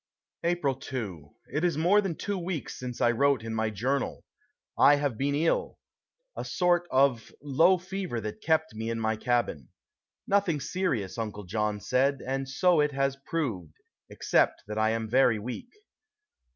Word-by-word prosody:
April 170 -5 +1
2. 110 - -6 0.2
It 150 - 0
is 170 -4 +1
more 180 +6 +4
than 190 -5 -3
two 205 - -3
weeks 175 -4 -4
since 125 -1 -6
I 120 - +4
wrote 140 -1 +2
in 115 -1 -4
my 110 0 0
journal. 125 +7 -2 0.5
I 145 - +6
have 145 -4 -1
been 140 +4 0
ill 160 +3 0 0.6
a - - -4
sort 175 -1 +1
of 130 -3 +2
low 160 +7 +4
fever 185 -7 -4
that 105 -1 -6
kept 160 -2 +1
me 110 +1 -4
in 115 0 -2
my 110 0 0
cabin. 120 - -1 0.6
Nothing 195 -6 +2
serious, 135 - -2
Uncle 105 -2 -4
John 105 +2 -1
said, 130 +7 +1
and 135 +1 -2
so 175 +4 +3
it 150 -1 +2
has 135 0 0
proved, 105 - -3 0.3
except - - +1
that 105 +1 -4
I 110 0 +3
am 110 0 -1
very 125 0 +4
weak. 125 - -6
135 Hz, 165 wpm, -28 LUFS, 110-160 Hz, 0.6 s, I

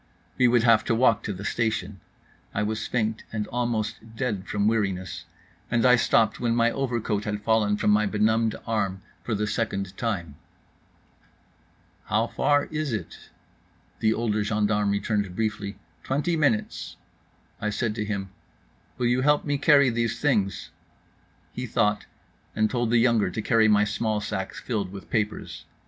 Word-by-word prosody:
We 125 - +4
would 120 -1 +3
have 115 -2 +5
to 115 - +1
walk 115 -3 +3
to - - -2
the 100 +1 -7
station. 110 -4 -1 0.6
I 105 - +1
was 110 +1 -2
faint 110 -2 -1
and 110 -2 -2
almost 115 -2 -3
dead 110 -7 -2
from 105 0 0
weariness 95 -4 -1 0.4
and 120 0 +2
I 125 0 +7
stopped 115 -2 +2
when 115 -1 +1
my 120 0 +3
overcoat 115 -6 -2
had 105 0 -3
fallen 105 -2 +2
from 105 - +2
my 105 0 +3
benumbed 110 +2 +1
arm 100 -4 -1 0.2
for 115 - -1
the 105 +1 0
second 100 -3 -2
time: 85 - -3 1.7
"How 110 +1 +1
far 145 +4 +1
is 155 -3 -2
it?" 100 -7 -6 0.7
The 110 - +3
older 110 -2 0
gendarme 105 -1 +1
returned 100 -2 -1
briefly, 105 -2 -2 0.3
"Twenty 150 +6 0
minutes." 140 -9 0 0.7
I 105 - 0
said 105 +1 -1
to 105 - -3
him: 100 -2 -4 0.7
"Will 125 - -1
you 125 +2 +2
help 145 +2 +3
me 145 -2 0
carry 140 -4 +5
these 115 -1 -1
things?" 105 -10 0 0.8
He - - -4
thought, 105 0 +1 0.5
and 110 0 +1
told 120 -2 0
the 120 - +4
younger 115 -4 +3
to 110 - -5
carry 110 0 +4
my 105 -1 +5
small 105 +1 -1
sack 100 -2 -4
filled 100 -6 -3
with 100 0 -10
papers. 105 -1 -2
110 Hz, 160 wpm, -26 LUFS, 105-120 Hz, 1.7 s, I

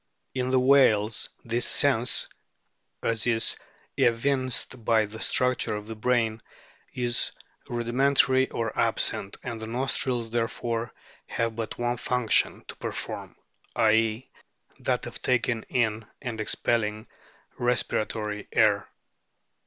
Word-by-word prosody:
In 130 -1 -1
the 130 0 +3
whales 125 -5 +4 0.2
this 120 +1 0
sense, 125 -4 +3 0.8
as 115 0 0
is 115 -2 +4 0.4
evinced 130 0 +1
by 110 -1 +3
the 110 +2 -9
structure 125 -3 +1
of 105 0 -6
the 110 +1 -7
brain, 115 -1 0 0.5
is 120 -1 +1 0.4
rudimentary 130 +2 +2
or 115 -1 -3
absent, 100 - 0
and 115 -2 -5
the 110 - -5
nostrils 120 -1 -1
therefore 115 0 -2 0.4
have 115 -1 -2
but 115 -1 -5
one 120 0 -1
function 125 -1 +1
to - - -8
perform, - - -6 0.4
i.e., 110 +2 +2 0.5
that - - -1
of - - -8
taking 120 -2 +1
in 110 -3 0
and 120 -5 -4
expelling 110 0 0 0.5
respira 120 -3 +1
tory 105 -2 -5
air. 105 -2 +3
115 Hz, 115 wpm, -27 LUFS, 110-125 Hz, 0.8 s, whales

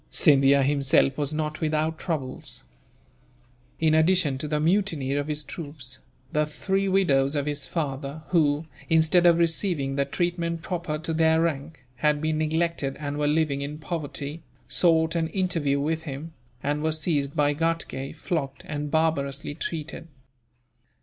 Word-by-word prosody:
Scindia 140 -2 +5
himself 135 -1 +3
was 145 0 -2
not 155 0 -3
without 155 0 0
troubles. 150 -7 -3 1.2
In 160 -1 +3
addition 160 -4 +3
to 150 - -3
the 150 0 0
mutiny 160 -5 +1
of 145 +1 -1
his 150 0 -2
troops, 145 -6 -7 0.3
the 150 0 +1
three 195 +5 -1
widows 145 -8 +3
of 145 -1 0
his 145 -1 -3
father 145 -1 -3
who, 155 -3 +2 0.2
instead 165 +2 +5
of 170 -1 +6
receiving 165 -5 0
the 140 - +2
treatment 170 +2 -2
proper 170 -4 -2
to 160 +1 -3
their 160 0 +4
rank, 155 -3 -3
had 150 +2 +2
been 155 0 0
neglected 155 -3 0
and 145 0 -3
were 145 - +2
living 150 -2 +1
in 145 +2 -4
poverty, 155 -1 -5 0.3
sought 165 -2 +3
an 165 -1 0
interview 165 -6 0
with 160 +3 -1
him; 155 +2 -7 0.3
and 145 +1 0
were 160 +1 +1
seized 150 -3 -1
by 145 -1 +3
Ghatgay, 165 -3 -2
flogged, 155 -4 -3
and 150 -1 -4
barbarously 145 -2 0
treated. 160 +1 -5
155 Hz, 150 wpm, -26 LUFS, 145-165 Hz, 1.2 s, of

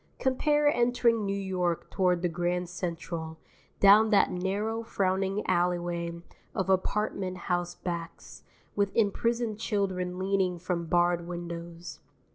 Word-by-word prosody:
Compare 295 +3 +2
entering 235 -3 +2
New 200 0 -1
York 180 -3 -1
toward 180 -2 +1
the - - +3
Grand 175 +1 -1
Central, 170 -2 -5 0.4
down 210 +2 +7
that 210 - +4
narrow 205 +5 -1
frowning 195 -1 -1
alleyway 175 -1 -1 0.3
of 190 0 0
apartment 190 -1 0
house 175 0 -2
backs, 170 -2 -6 0.3
with 200 -1 +1
imprisoned 230 +1 +1
children 185 -5 -1
leaning 190 -1 0
from 175 -1 -3
barred 175 0 +2
windows. 170 0 -7
185 Hz, 115 wpm, -29 LUFS, 175-200 Hz, 0.4 s, down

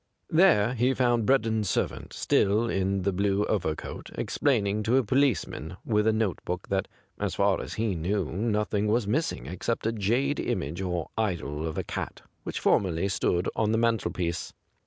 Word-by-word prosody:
There 155 - +5
he 125 +2 +2
found 120 -3 +2
Breddon's 110 -6 +2
sei'vant, - - -2
still 105 +4 +2
in 95 -2 0
the 100 0 +1
blue 100 +2 +1
overcoat, 85 -7 -3
explaining 105 -7 +1
to 115 +5 +2
a 135 - +3
policeman 105 - 0
with 105 -1 +2
a - - +5
notebook 95 -4 -2
that 95 -1 0 0.3
as - - -2
far - - +2
as - - -6
he 110 -2 0
knew 90 +3 -1
nothing 105 +1 0
was 110 +1 +2
miss 140 +11 +1
ing - - -8
except 90 - -3
a 115 - +2
jade 120 +7 0
image 80 +6 -2
or 90 -3 -3
idol 80 -7 -1
of 80 - -5
a - - -1
cat - - -5 0.2
which - - -4
formerly 95 0 +2
stood 90 -2 0
on 110 -1 +1
the - - +3
mantelpiece. 100 -7 -1
105 Hz, 170 wpm, -27 LUFS, 90-115 Hz, 0.3 s, There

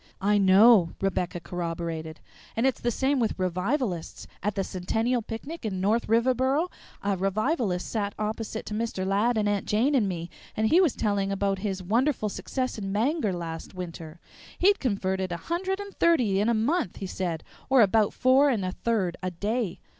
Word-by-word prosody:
"I 205 +1 +3
know," 195 -1 +6
Rebecca 180 -2 -1
corroborated; 165 -2 -5 0.3
"and 230 - +1
it's 265 - +1
the 240 - +1
same 265 +4 +1
with 225 -3 0
revivalists. 185 - -2 0.2
At 205 +2 -1
the 195 - 0
Centennial 225 +7 -1
picnic 255 +10 -7
at 215 -3 -2
North 205 +5 +1
Riverboro, 260 +8 +2 0.3
a 200 -1 +1
revivalist 195 - 0
sat 205 -3 -2
opposite 220 +1 -3
to - - -6
Mr. 215 -4 -2
Ladd 210 +5 +2
and 210 -1 +1
Aunt 205 -1 -1
Jane 235 +8 +2
and 225 -8 +3
me, 170 -2 -5 0.3
and 220 0 +2
he 350 - +6
was 335 -9 +2
telling 200 -2 0
about 195 0 0
his 190 -2 -3
wonderful 230 +3 +1
success 255 +3 -3
in 195 -1 -4
Bangor 225 - +1
last 165 0 -6
winter. 170 -2 -7 0.4
He'd 400 +3 +4
converted 190 -6 -1
a 175 - -2
hundred 375 - -2
and 400 -1 -8
thirty 245 -13 +3
in 210 +3 +2
a 235 - +3
month, 230 - 0
he 195 - -6
said, 175 -4 -3 0.3
or 265 -3 +6
about 210 +1 +3
four 265 +3 +4
and 215 -8 0
a 185 - -1
third 195 -5 -1
a 185 - -1
day. 205 +2 -2
210 Hz, 180 wpm, -27 LUFS, 185-245 Hz, 0.4 s, know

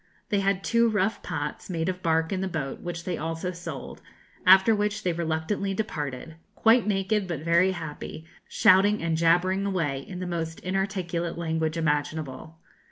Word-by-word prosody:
They 205 - +2
had 195 -1 0
two 235 0 +3
rough 210 0 0
pots, 150 -1 -5
made 165 -2 -2
of 185 -1 -2
bark, 160 -1 +1
in 190 - -1
the 190 - -1
boat, 150 -6 -4
which 170 -1 -5
they 175 -2 -3
also 165 +3 -3
sold, 170 -5 -8 0.5
after 190 +4 +8
which 210 0 -1
they 180 - +1
reluctantly 170 +4 -2
departed, 155 -6 -4 0.2
quite 230 0 +4
naked 195 0 0
but 165 -5 -4
very 170 +3 +3
happy, 160 -1 -7 0.2
shouting 200 +1 +4
and 165 -1 +1
jabbering 175 +4 +3
away 165 -9 -1
in 180 +7 -8
the 185 - -4
most 165 -2 -3
inarticulate 185 -3 -2
language 160 -1 -1
imaginable. 155 -1 -2
175 Hz, 165 wpm, -26 LUFS, 160-195 Hz, 0.5 s, after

